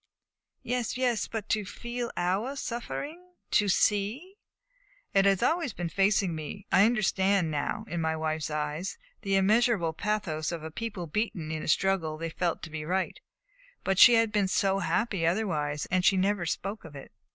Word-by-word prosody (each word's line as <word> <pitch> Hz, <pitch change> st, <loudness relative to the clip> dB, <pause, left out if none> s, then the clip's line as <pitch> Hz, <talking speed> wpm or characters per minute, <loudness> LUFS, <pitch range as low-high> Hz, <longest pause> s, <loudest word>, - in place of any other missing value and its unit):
"Yes, 245 Hz, -1 st, -2 dB
yes; 245 Hz, -5 st, +1 dB
but 220 Hz, -2 st, -5 dB
to 215 Hz, -, +1 dB
feel 235 Hz, +4 st, -5 dB
our 195 Hz, +10 st, 0 dB
suffering, 295 Hz, +8 st, -5 dB, 0.2 s
to 205 Hz, -1 st, +3 dB
see 210 Hz, -, +1 dB, 0.4 s
" -, -, -35 dB
"It 195 Hz, -1 st, +4 dB
has 195 Hz, -2 st, +3 dB
always 325 Hz, -, +1 dB
been 175 Hz, -3 st, -4 dB
facing 195 Hz, 0 st, +2 dB
me, 160 Hz, +6 st, -6 dB
I 195 Hz, -, +6 dB
understand 195 Hz, -6 st, +2 dB
now, 150 Hz, +8 st, -2 dB
in 170 Hz, -4 st, -3 dB
my 160 Hz, 0 st, 0 dB
wife's 155 Hz, -1 st, -2 dB
eyes 150 Hz, +4 st, -3 dB, 0.2 s
the 195 Hz, -1 st, 0 dB
immeasurable 200 Hz, -3 st, +3 dB
pathos 175 Hz, -6 st, -2 dB
of 165 Hz, -2 st, -5 dB
a 160 Hz, -, -6 dB
people 205 Hz, -2 st, -5 dB
beaten 170 Hz, -3 st, -2 dB
in 160 Hz, -1 st, -3 dB
a -, -, -6 dB
struggle 165 Hz, -3 st, +1 dB
they 165 Hz, +1 st, -4 dB
felt 170 Hz, 0 st, -2 dB
to 160 Hz, -, -7 dB
be 155 Hz, -1 st, -4 dB
right; 185 Hz, +4 st, -1 dB, 0.6 s
but 195 Hz, -1 st, +1 dB
she 240 Hz, -, +9 dB
had 225 Hz, -1 st, +3 dB
been 205 Hz, -2 st, +2 dB
so 195 Hz, +1 st, +1 dB
happy 200 Hz, -3 st, 0 dB
otherwise, 165 Hz, -6 st, 0 dB
and 185 Hz, 0 st, +2 dB
she 190 Hz, -, +4 dB
never 190 Hz, -2 st, +1 dB
spoke 200 Hz, +6 st, -3 dB
of 160 Hz, -3 st, -11 dB
it." 135 Hz, -, -10 dB
195 Hz, 175 wpm, -28 LUFS, 165-220 Hz, 0.6 s, she